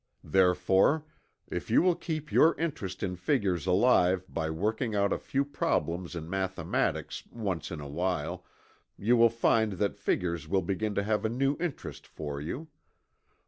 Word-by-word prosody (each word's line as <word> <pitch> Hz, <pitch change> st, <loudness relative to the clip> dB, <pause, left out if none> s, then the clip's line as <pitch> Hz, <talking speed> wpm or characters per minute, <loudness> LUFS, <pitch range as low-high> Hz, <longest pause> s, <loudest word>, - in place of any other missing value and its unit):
Therefore, 95 Hz, -, +3 dB, 0.5 s
if -, -, -4 dB
you -, -, +5 dB
will 180 Hz, -1 st, +4 dB
keep 155 Hz, -2 st, -5 dB
your 165 Hz, -, +5 dB
interest 115 Hz, -, -3 dB
in 90 Hz, -2 st, -2 dB
figures 90 Hz, -, 0 dB
alive 95 Hz, -2 st, +4 dB
by 80 Hz, -4 st, -3 dB
working 110 Hz, +7 st, -1 dB
out 100 Hz, -1 st, +2 dB
a -, -, -2 dB
few 140 Hz, +1 st, -1 dB
problems 90 Hz, -, -1 dB
in 80 Hz, -2 st, -5 dB
mathematics, 95 Hz, +1 st, -1 dB
once 100 Hz, -8 st, -3 dB
in 80 Hz, -, -6 dB
a 75 Hz, -, -7 dB
while, 85 Hz, +1 st, -2 dB, 0.5 s
you 115 Hz, +5 st, +3 dB
will 115 Hz, 0 st, +6 dB
find 110 Hz, -2 st, +2 dB
that 100 Hz, +2 st, -1 dB
figures 85 Hz, -3 st, -1 dB
will 95 Hz, +1 st, +1 dB
begin 100 Hz, +3 st, -2 dB
to 100 Hz, -, +1 dB
have 105 Hz, +1 st, 0 dB
a 110 Hz, -, +1 dB
new 135 Hz, +4 st, +1 dB
interest 170 Hz, -5 st, -5 dB
for 70 Hz, -2 st, -6 dB
you. 130 Hz, -, -5 dB
95 Hz, 160 wpm, -29 LUFS, 90-115 Hz, 0.5 s, will